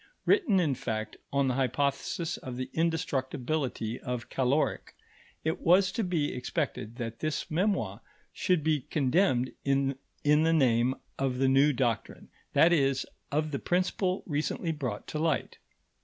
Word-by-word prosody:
Written, 215 - +4
in 155 -6 +2
fact, 110 -3 -4
on 140 -1 +2
the 130 - +1
hypothesis 140 +6 -1
of 125 -1 -7
the 130 - -4
indestructibility 135 -6 -1
of 125 -2 -5
caloric, 135 +3 0 0.5
it 160 +1 -1
was 185 +2 +5
to 225 - -1
be 170 -6 0
expected 125 -4 -3
that 115 -2 -5
this 155 0 -2
memoir 160 - 0 0.3
should 180 -5 +1
be 155 -1 +2
condemned 130 -2 +1
in 140 0 +1 0.3
the 150 +2 +4
name 125 -4 +3 0.2
of 135 -2 0
the 135 +1 +2
new 135 +3 +5
doctrine, 120 -4 -2 0.2
that 170 +2 +6
is, 135 -4 +2 0.3
of 155 +1 0
the 140 - -2
principle 185 +1 0
recently 155 +2 -1
brought 130 -9 -4
to 155 - -3
light. 160 0 -1
140 Hz, 140 wpm, -29 LUFS, 125-160 Hz, 0.5 s, that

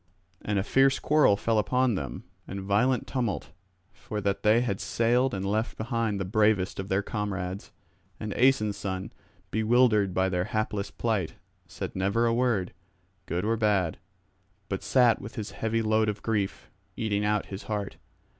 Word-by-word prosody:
And 105 -1 -1
a 95 - +1
fierce 135 +4 +3
quarrel 150 -9 +4
fell 110 +1 +1
upon 125 +3 +2
them, 70 -10 -4 0.2
and 95 - -5
violent 105 +6 +1
tumult, 120 -7 -2 0.4
for 105 - -6
that 100 -1 -1
they 110 +2 +4
had 110 -6 -2
sailed 120 +3 +2
and 95 -2 -3
left 110 +3 -1
behind 115 -2 -1
the 95 - -2
bravest 105 -2 +2
of 95 0 -5
their 95 +2 +1
comrades. 100 -4 -4 0.5
And 105 -1 -4
Aeson's 110 -6 +3
son, 95 -1 -4 0.4
bewildered 110 -3 +3
by 95 0 +3
their 90 -1 0
hapless 105 -1 -2
plight, 110 -8 -2 0.3
said - - -6
never 100 +5 +1
a 115 - +2
word, 115 -7 +1 0.5
good 90 +3 -1
or 115 +1 +1
bad; 100 -7 +1 0.7
but - - -2
sat 125 -3 +3
with 105 - -9
his 110 -1 -5
heavy 115 0 -1
load 110 0 +2
of 105 -1 -5
grief, 105 -4 -2 0.3
eating 105 -2 0
out 105 0 +1
his 95 - -6
heart. 105 -2 -3
105 Hz, 165 wpm, -27 LUFS, 100-115 Hz, 0.7 s, quarrel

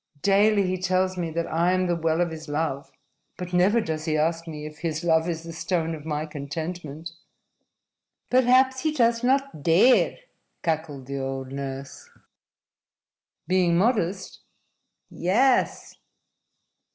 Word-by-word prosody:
Daily 200 +1 +4
he 185 0 -2
tells 185 0 +1
me 175 -2 -3
that 165 +1 -2
I 170 +3 +1
am 185 0 +1
the 175 -1 +1
well 165 0 0
of 175 -1 0
his 160 -1 -8
love. 145 -2 -2 0.5
But 180 0 -7
never 190 +6 +4
does 160 -6 -3
he 155 -2 0
ask 165 +2 0
me 150 -2 -7
if 155 0 -10
his 165 -1 -3
love 160 0 +2
is 165 -1 -4
the 165 0 -8
stone 165 0 -1
of 155 -1 -8
my 150 0 -2
contentment." 155 +1 -6 1.2
"Perhaps 260 +1 +4
he 310 +3 0
does 235 -4 +2
not 270 - +1
dare," 175 - +4 0.5
cackled 155 -5 -2
the 140 +1 -4
old 135 0 -4
nurse. 135 0 -7 1.4
"Being 180 -1 +2
modest?" 195 -3 0 0.7
"Yes." 245 +9 +1
170 Hz, 140 wpm, -25 LUFS, 155-185 Hz, 1.4 s, Daily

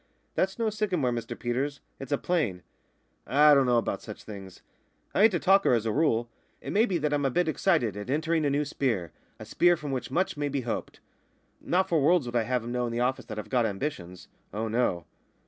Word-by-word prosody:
"That's 190 +1 0
no 225 -2 0
sycamore, 185 -11 0
Mr 115 -1 -4
Peters. 135 +4 -2 0.2
It's 135 0 -8
a 145 - +2
plane." 135 - -1 0.6
"I 150 +3 +6
don't 135 -2 +4
know 120 -1 +3
about 115 - -1
such - - -9
things. 95 -3 -10 0.5
I - - +2
ain't 220 -1 +6
a - - +1
talker 195 -6 +4
as 115 -2 +1
a 110 - 0
rule. 120 -4 +1 0.3
It - - -6
may 220 +4 +4
be 185 - 0
that 150 -2 -1
I'm 145 -1 +1
a 135 - +2
bit 175 +6 +1
excited 155 - +1
at 105 +3 -7
entering 160 +3 +1
on 150 - +1
a - - +2
new 145 +2 0
sp'ere, 115 - -1 0.3
a - - -8
sp'ere 175 0 +3
from 150 -3 -6
which 130 -2 -3
much 185 -3 -1
may 145 -1 -1
be 140 -1 -2
hoped. 120 -2 -5 0.6
Not 185 +2 +1
for 165 -3 +2
worlds 160 0 +3
would 120 0 -6
I 120 - +3
have 125 -1 -1
'em 120 - -5
know 125 0 -1
in - - -4
the 115 - -2
office 125 +2 0
that 110 - -7
I've 105 - -6
got 120 -3 +2
ambitions 95 - -5 0.2
oh, 110 +3 -3
no!" 110 -7 0
135 Hz, 235 wpm, -28 LUFS, 115-160 Hz, 0.6 s, I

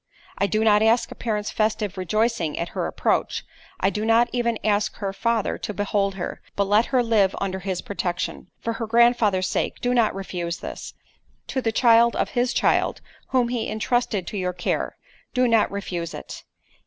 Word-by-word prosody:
_' - - -58 0.4
"I 200 - +3
do 215 +2 +1
not 210 -1 +5
ask 225 +2 +3
a - - -4
parent's 210 -3 -2
festive 215 -2 0
rejoicing 200 -2 0
at 170 - -2
her - - -2
approach—I 325 - -2
do 210 +1 -3
not 230 +2 +4
even 235 -2 0
ask 210 0 +1
her 195 -2 -4
father 230 +1 0
to 210 - -5
behold 200 -1 0
her; 180 - -5
but 200 - +2
let 205 +3 +3
her 255 -2 +2
live 210 -5 +3
under 190 -1 -2
his 190 -1 -3
protection. 180 -3 -3
For 230 - -2
her 230 0 -4
grandfather's 230 -5 +4
sake - - -2
do 245 0 0
not 230 -5 +2
refuse 175 -3 -4
this—to 260 - -8
the 225 -2 0
child 235 0 +5
of - - 0
his 245 0 0
child, - - +1 0.3
whom 250 -2 +2
he 240 -2 -2
entrusted 220 -3 0
to 205 - -5
your 180 -1 -1
care, 175 - -2 0.4
do 250 0 +3
not 230 -2 +3
refuse 180 -4 -4
it. - - -9
215 Hz, 180 wpm, -24 LUFS, 195-235 Hz, 0.4 s, not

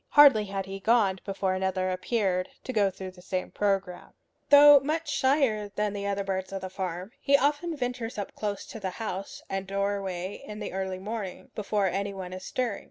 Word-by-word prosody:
Hardly 275 -8 +7
had 195 -1 -3
he 195 0 -6
gone 200 -3 +3
before 195 -2 -1
another 185 0 0
appeared, 185 -1 0
to 255 - -5
go 205 -3 +3
through 190 0 -8
the 180 -1 -16
same 185 0 -3
program. 195 -3 -1 0.4
Though 290 0 +10
much 310 +4 -2
shyer 260 -8 +2
than 210 -1 -1
other 200 0 -1
birds 190 -1 -3
of 195 -1 -4
the 185 0 -6
farm, 185 +1 -4
he 280 0 +5
often 295 +4 0
ventures 245 -3 -3
up 205 - -4
close 205 -2 -3
to 225 - -8
the 190 -2 -2
house 195 -4 -5
and 195 0 -3
doorway 195 -2 -2
in 210 - -8
the 210 - -5
early 190 -1 -2
morning, 200 0 -6
before 205 -1 0
any 195 +2 -1
one 185 -1 -6
is 185 0 -7
stirring. 245 -5 -2
200 Hz, 190 wpm, -28 LUFS, 190-225 Hz, 0.4 s, Though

